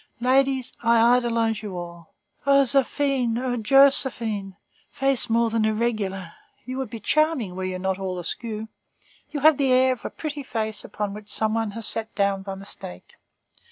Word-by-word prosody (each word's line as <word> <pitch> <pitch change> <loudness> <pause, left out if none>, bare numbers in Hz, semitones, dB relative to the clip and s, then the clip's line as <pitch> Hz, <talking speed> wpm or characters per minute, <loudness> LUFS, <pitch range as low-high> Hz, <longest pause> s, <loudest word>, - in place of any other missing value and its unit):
Ladies, 265 +1 +2
I 235 0 +4 0.2
idolize 230 -3 0
you 200 -4 -6
all. 170 -1 -9 0.3
O 275 0 +6
Zéphine, 270 -2 +1
O 250 0 -2
Joséphine, 230 -5 +3 0.3
face 270 -3 +3
more 230 0 +2
than 225 -1 +1
irregular, 215 -5 -2 0.3
you 255 +2 -5
would 265 -4 -4
be 230 - -7
charming 300 - 0
were 185 0 -4
you 185 0 -3
not 190 +1 -2
all 185 -1 -4
askew. 215 +5 -5 0.6
You 290 - -5
have 310 0 +6
the 270 -2 +2
air 255 0 +4
of 250 - -12
a - - -4
pretty 300 -2 -6
face 220 -5 -4
upon 205 -1 -4
which 210 0 -10
some 220 0 -1
one 225 -1 -1
has 230 - -5
sat 225 -1 0
down 200 -1 +1
by 195 0 -6
mistake. 190 - -11
225 Hz, 170 wpm, -24 LUFS, 200-260 Hz, 0.6 s, O